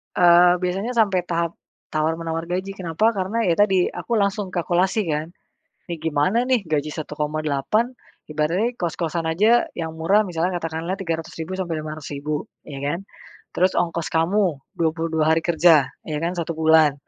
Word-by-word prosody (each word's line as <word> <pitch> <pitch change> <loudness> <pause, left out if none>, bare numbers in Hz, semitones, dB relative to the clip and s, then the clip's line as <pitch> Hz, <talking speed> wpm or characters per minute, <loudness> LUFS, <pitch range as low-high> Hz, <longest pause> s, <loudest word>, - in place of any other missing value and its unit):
Eee, 175 0 +6
biasanya 195 +7 -1
sampai 195 -6 +2
tahap 170 -1 -2 0.3
tawar 155 +1 0
menawar 165 0 -4
gaji, 185 +3 -3
kenapa, 185 +5 +1
karena 195 +5 -1
ya - - +4
tadi 190 -3 +3
aku 235 - -5
langsung 200 -3 0
kalkulasi 180 +4 +1
kan. 150 +1 -1 0.6
Nih 170 - -3
gimana 165 +11 +1
nih 255 -5 +2
gaji 150 0 0
1,8, 155 - -1 0.4
ibaratnya 165 +10 +1
kos-kosan 170 -1 -2
aja 210 +9 +3
yang 165 -2 -3
murah 195 +6 +3
misalnya 180 -2 -2
katakanlah 165 +2 -3
300.000 165 -1 -4
sampai 175 -3 -2
500.000, 150 -1 -5 0.2
ya 140 -2 -8
kan. 145 +5 -2 0.6
Terus 185 +1 +2
ongkos 170 -1 0
kamu 190 +5 +3 0.3
22 160 -1 0
hari 165 - 0
kerja, 160 -5 +4 0.2
ya 150 -2 -2
kan 170 +1 0
1 165 0 -2
bulan. 160 -2 +4
170 Hz, 150 wpm, -22 LUFS, 160-190 Hz, 0.6 s, Eee